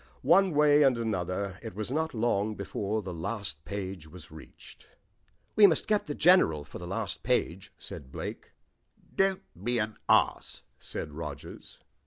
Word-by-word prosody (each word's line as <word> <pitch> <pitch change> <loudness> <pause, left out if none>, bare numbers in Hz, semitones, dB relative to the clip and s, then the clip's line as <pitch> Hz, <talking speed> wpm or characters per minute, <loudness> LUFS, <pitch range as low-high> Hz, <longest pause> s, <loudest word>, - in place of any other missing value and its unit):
One 185 -2 +4
way 150 0 +5
and 135 -4 +4
another 95 -3 -2
it - - -8
was 110 +3 -4
not 160 0 -1
long 110 -2 0
before 100 +2 -3
the 90 -1 -5
last 85 -3 -4
page 95 -5 -5
was 80 0 -13
reached. 80 0 -14 0.7
"We 210 -1 +9
must 165 - +1
get 210 -4 +1
the 145 - -3
General 155 - +4
for 75 - -10
the 90 - -7
last - - -3
page," 90 +3 -1
said 65 -2 -9
Blake. - - -6 0.7
"Don't 195 -1 +2 0.2
be 120 +2 0
an 110 -1 -2
ass," - - +2 0.2
said - - -6
Rogers. 75 -3 -8
105 Hz, 155 wpm, -29 LUFS, 90-145 Hz, 0.7 s, We